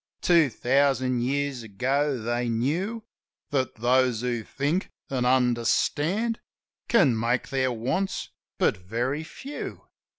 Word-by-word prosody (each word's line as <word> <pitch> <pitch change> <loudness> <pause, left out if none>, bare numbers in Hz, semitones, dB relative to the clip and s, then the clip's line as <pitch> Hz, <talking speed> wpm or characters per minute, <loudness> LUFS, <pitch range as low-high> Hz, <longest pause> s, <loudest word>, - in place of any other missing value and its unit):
"Two 170 -5 +5
thousand 130 0 +2
years 140 0 -1
ago 130 +6 0
they 120 +1 -1
knew 170 - -1 0.5
That 130 -2 0
those 125 0 +2
who 120 -2 -1
think 145 - -1 0.2
an' 125 -2 0
understand 130 - +2 0.5
Can 165 - +4
make 120 +3 0
their 130 -1 +1
wants 130 +12 -2 0.3
but - - +2
very 120 +11 -2
few. 270 - -7
130 Hz, 110 wpm, -26 LUFS, 120-145 Hz, 0.5 s, Two